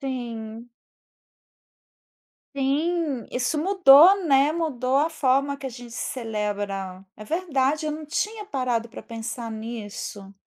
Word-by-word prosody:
Sim. 235 Hz, -3 st, -6 dB, 1.8 s
Sim. 285 Hz, -1 st, 0 dB
Isso 250 Hz, +5 st, -1 dB
mudou, 370 Hz, 0 st, +7 dB
né, 280 Hz, +1 st, +4 dB
mudou 270 Hz, -6 st, -1 dB
a 310 Hz, +3 st, +2 dB
forma 280 Hz, -2 st, +1 dB
que 275 Hz, -, -7 dB
a -, -, -2 dB
gente 240 Hz, -1 st, -11 dB
celebra. 205 Hz, -6 st, -4 dB
É 215 Hz, -, -10 dB
verdade, 310 Hz, -, 0 dB
eu 305 Hz, -, -1 dB
não 310 Hz, 0 st, -7 dB
tinha 420 Hz, +7 st, -2 dB
parado 250 Hz, -, -1 dB
pra -, -, -10 dB
pensar 230 Hz, +1 st, -6 dB
nisso. 215 Hz, -3 st, -7 dB
260 Hz, 120 wpm, -24 LUFS, 230-305 Hz, 1.8 s, mudou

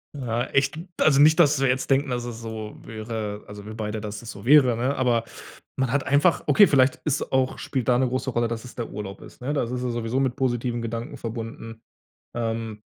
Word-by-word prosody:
Ja, 120 Hz, -3 st, -2 dB
echt 135 Hz, +1 st, +1 dB, 0.2 s
also, 140 Hz, -3 st, +5 dB
nicht, 155 Hz, +2 st, +6 dB
dass 150 Hz, -4 st, +5 dB
wir 135 Hz, -, +3 dB
jetzt 130 Hz, +1 st, 0 dB
denken, 135 Hz, +1 st, +3 dB
dass 120 Hz, -1 st, -2 dB
es 120 Hz, -1 st, -7 dB
so 110 Hz, -1 st, -6 dB
wäre 110 Hz, -2 st, -5 dB
also, 105 Hz, 0 st, -10 dB
wir 110 Hz, -, -7 dB
beide, 110 Hz, -1 st, -4 dB
dass 105 Hz, +1 st, -6 dB
es 115 Hz, -, -7 dB
so 100 Hz, -, -11 dB
wäre, 130 Hz, -1 st, +6 dB
ne? 130 Hz, +5 st, 0 dB
Aber 120 Hz, -3 st, +2 dB, 0.5 s
man 130 Hz, -3 st, 0 dB
hat 140 Hz, 0 st, +1 dB
einfach 145 Hz, +6 st, +3 dB
okay, 210 Hz, -, +7 dB
vielleicht 135 Hz, -6 st, +4 dB
ist 150 Hz, -2 st, -1 dB
auch 130 Hz, -1 st, +1 dB
spielt 130 Hz, -4 st, -3 dB
da 125 Hz, -1 st, +4 dB
'ne 130 Hz, -, +2 dB
große 130 Hz, +1 st, -2 dB
Rolle, 120 Hz, 0 st, +1 dB
dass 115 Hz, +1 st, -5 dB
es 125 Hz, -, -10 dB
der 120 Hz, -, -4 dB
Urlaub 100 Hz, -1 st, -7 dB
ist, -, -, -14 dB
ne? 135 Hz, +4 st, -2 dB
Da 145 Hz, -, +1 dB
ist 120 Hz, -, -5 dB
es 125 Hz, 0 st, -3 dB
sowieso 120 Hz, 0 st, -1 dB
mit 130 Hz, -3 st, 0 dB
positiven 120 Hz, -2 st, -1 dB
Gedanken 115 Hz, +1 st, -5 dB
verbunden. 115 Hz, -1 st, -7 dB, 0.5 s
Ähm, 115 Hz, -2 st, -3 dB
120 Hz, 220 wpm, -25 LUFS, 115-130 Hz, 0.5 s, okay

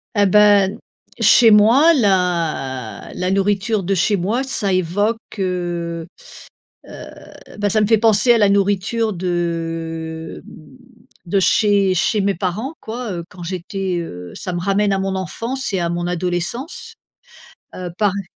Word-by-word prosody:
Et 205 Hz, 0 st, +4 dB
beh, 205 Hz, -1 st, +5 dB, 0.5 s
chez 230 Hz, -3 st, +6 dB
moi 240 Hz, +11 st, +6 dB
la 170 Hz, -, -1 dB
la 180 Hz, +1 st, -2 dB
nourriture 200 Hz, +1 st, 0 dB
de 195 Hz, +2 st, 0 dB
chez 195 Hz, +3 st, +2 dB
moi 220 Hz, +9 st, -1 dB
ça 240 Hz, -7 st, -2 dB
évoque, 205 Hz, +6 st, 0 dB, 0.2 s
heu 175 Hz, -2 st, -3 dB, 0.8 s
heu, -, -, -10 dB, 0.5 s
bah, 205 Hz, 0 st, 0 dB
ça 215 Hz, -, +2 dB
me 210 Hz, -, +2 dB
fait 225 Hz, 0 st, +4 dB
penser 225 Hz, +2 st, +4 dB
à -, -, +3 dB
la 205 Hz, -2 st, +4 dB
nourriture 200 Hz, +3 st, +1 dB
de 165 Hz, -2 st, -4 dB, 0.8 s
de 195 Hz, +3 st, +1 dB
chez 200 Hz, 0 st, +3 dB
chez 205 Hz, +4 st, +1 dB
mes 200 Hz, 0 st, +1 dB
parents 205 Hz, -, -3 dB
quoi, 230 Hz, -1 st, -5 dB
heu, 170 Hz, -2 st, -5 dB
quand 180 Hz, -1 st, -12 dB
j'étais, 185 Hz, +1 st, -3 dB
heu 90 Hz, -, -8 dB
ça 185 Hz, -, -5 dB
me 175 Hz, -, -3 dB
ramène 200 Hz, +2 st, +1 dB
à 195 Hz, -, +1 dB
mon 195 Hz, 0 st, -2 dB
enfance 230 Hz, +8 st, -4 dB
et 190 Hz, -, 0 dB
à 170 Hz, -, -1 dB
mon 175 Hz, 0 st, -2 dB
adolescence, 180 Hz, -, -4 dB, 0.8 s
heu, 180 Hz, -1 st, -6 dB
par 210 Hz, -2 st, +3 dB
e 200 Hz, -1 st, -5 dB
195 Hz, 150 wpm, -19 LUFS, 175-210 Hz, 0.8 s, chez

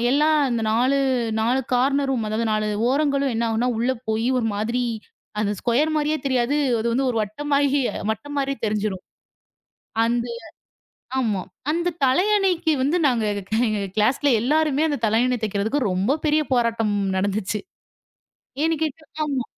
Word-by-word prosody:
எல்லாம் 305 Hz, +3 st, +3 dB
அந்த 235 Hz, -2 st, -1 dB
4,4 250 Hz, -1 st, +1 dB
corner 275 Hz, +3 st, +2 dB
room 230 Hz, -5 st, -1 dB
அதாவது 225 Hz, +2 st, -1 dB
4 215 Hz, 0 st, 0 dB, 0.2 s
ஓரங்களும் 280 Hz, -1 st, +1 dB
என்ன 230 Hz, +1 st, 0 dB
ஆகும் 225 Hz, 0 st, -1 dB
என்றால்? 245 Hz, -1 st, 0 dB
உள்ளே 255 Hz, +3 st, +1 dB
போய் 220 Hz, +2 st, 0 dB
ஒரு 225 Hz, -, 0 dB
மாதிரி 235 Hz, +4 st, -1 dB, 0.6 s
அந்த 205 Hz, -1 st, 0 dB
ஸ்குயர் 295 Hz, +7 st, +1 dB
மாதிரியே 305 Hz, +1 st, 0 dB
தெரியாது. 260 Hz, +2 st, +1 dB, 0.2 s
அது 235 Hz, +4 st, 0 dB
ஒரு 230 Hz, -, -3 dB
வட்டமான 250 Hz, +9 st, -6 dB
மாதிரி 280 Hz, 0 st, +3 dB, 0.3 s
மட்டமான 285 Hz, +7 st, -5 dB
மாதிரி 275 Hz, 0 st, -1 dB
தெரிஞ்சிடும். 210 Hz, -3 st, -2 dB, 1.0 s
அந்த 235 Hz, +1 st, 0 dB, 0.9 s
ஆமா. 215 Hz, -6 st, 0 dB, 0.3 s
அந்தத் 340 Hz, +1 st, -1 dB
தலையணைக்கு 360 Hz, +2 st, +2 dB
வந்து 290 Hz, +7 st, +2 dB
நாங்க 235 Hz, -4 st, +1 dB, 0.4 s
எங்க 210 Hz, -2 st, -1 dB
கிளாஸில் 250 Hz, +7 st, +2 dB
எல்லாருமே 305 Hz, +2 st, +2 dB
அந்தத் 280 Hz, -7 st, -1 dB
தலையணை 245 Hz, +3 st, +2 dB
தைக்கறதுக்கு 215 Hz, +5 st, 0 dB
ரொம்ப 200 Hz, +11 st, +1 dB
பெரிய 305 Hz, 0 st, +3 dB
போராட்டம் 230 Hz, -3 st, +1 dB, 0.2 s
நடந்திருச்சு. 200 Hz, +1 st, -1 dB, 1.0 s
ஏன் -, -, +3 dB
என்று -, -, -6 dB
கேட்டால் 300 Hz, -3 st, -3 dB
250 Hz, 140 wpm, -23 LUFS, 225-290 Hz, 1.0 s, எல்லாம்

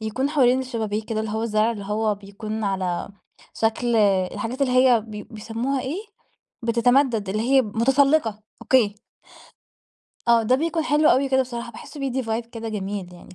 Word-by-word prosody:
يكون 235 Hz, +6 st, -2 dB
حوالين 260 Hz, -4 st, +3 dB
الشبابيك 220 Hz, -4 st, -3 dB
كده 220 Hz, -1 st, -2 dB
اللي 220 Hz, -, -3 dB
هو 220 Hz, +1 st, -2 dB
الزرع 215 Hz, 0 st, +1 dB
اللي 205 Hz, -3 st, -7 dB
هو 210 Hz, +1 st, 0 dB
بيكون 210 Hz, +2 st, -6 dB
على 190 Hz, -3 st, -2 dB, 0.5 s
شكل 230 Hz, +1 st, 0 dB
الحاجات 210 Hz, +5 st, +1 dB
اللي 260 Hz, -2 st, +1 dB
هي 255 Hz, -2 st, +5 dB
بي 210 Hz, -1 st, -8 dB
بيسموها 230 Hz, +6 st, -3 dB
إيه، 280 Hz, +9 st, -4 dB, 0.6 s
بتتمدد 235 Hz, -2 st, +2 dB
اللي 215 Hz, +3 st, -1 dB
هي 265 Hz, +2 st, +4 dB
متسلقة، 250 Hz, +1 st, +2 dB, 0.2 s
أوكي. 220 Hz, -6 st, +3 dB, 1.3 s
آه، 230 Hz, -1 st, +5 dB
ده 235 Hz, +4 st, +3 dB
بيكون 325 Hz, +1 st, -1 dB
حلو 305 Hz, 0 st, +3 dB
أوي 270 Hz, +2 st, +3 dB
كده 265 Hz, 0 st, +3 dB
بصراحة، 240 Hz, -1 st, -6 dB
باحسه 290 Hz, +6 st, -10 dB
بيدي 265 Hz, -1 st, -1 dB
vibe 225 Hz, 0 st, -3 dB
كده 230 Hz, -1 st, -7 dB
جميل 195 Hz, -3 st, -4 dB
يعني، 175 Hz, -, -14 dB
230 Hz, 160 wpm, -23 LUFS, 215-260 Hz, 1.3 s, هي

